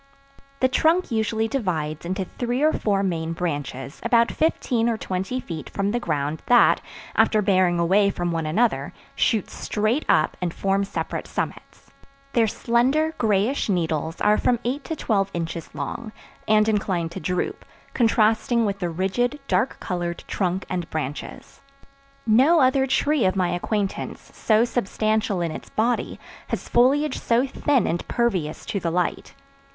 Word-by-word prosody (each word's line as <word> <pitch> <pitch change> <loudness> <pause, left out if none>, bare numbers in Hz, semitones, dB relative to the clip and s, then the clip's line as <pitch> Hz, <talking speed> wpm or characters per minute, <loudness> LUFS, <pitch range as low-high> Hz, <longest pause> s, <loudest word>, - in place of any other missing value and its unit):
The 260 - +5
trunk 320 +6 +2
usually 220 0 0
divides 170 - -2
into 190 +1 -2
three 245 +7 -2
or 310 - +4
four 200 -2 0
main 165 -3 -1
branches 145 -5 -4
about 235 0 +3
fifteen 245 -7 +1
or 230 - 0
twenty 190 +6 -3
feet 165 -10 -7
from 200 0 -1
the 240 - 0
ground 150 -6 -2
that, 245 -1 +5 0.3
after 215 - +4
bearing 185 -3 +3
away 190 +4 +3
from 175 -3 -2
one 165 -2 -2
another, 225 +9 +1 0.2
shoot 220 -5 +1
straight 215 +7 -1
up 155 - +3
and 175 -2 -2
form 195 0 +1
separate - - -4
summits. - - -6 0.4
Their 230 -2 +3
slender, 260 +9 +1
grayish 215 +4 +1
needles 165 -3 -1
are 210 0 +4
from 245 - +2
eight 270 +4 -2
to 320 - -3
twelve 200 -8 0
inches 165 -1 -4
long, 215 +10 -5 0.4
and 215 0 +4
inclined 190 -6 0
to 190 - -6
droop, 185 - -2 0.3
contrasting 230 0 +2
with 200 -1 -2
the 175 -3 -1
rigid, 195 - -1
dark 260 - 0
colored 175 -2 -3
trunk 185 -1 -1
and 175 -3 -3
branches. 145 -2 -6 0.6
No 265 +10 +5
other 265 0 +3
tree 285 0 +2
of 185 - +2
my 180 -2 +1
acquaintance 195 +3 -3
so 220 +1 +3
substantial 215 -3 0
in 170 -2 -1
its - - -8
body 235 +3 -1 0.3
has - - -4
foliage 280 +5 +3
so 240 +3 +2
thin 275 -1 +1
and 170 +1 -2
pervious 190 -11 -1
to 200 - -2
the 170 - -1
light. 175 +1 -2
210 Hz, 155 wpm, -23 LUFS, 175-240 Hz, 0.6 s, The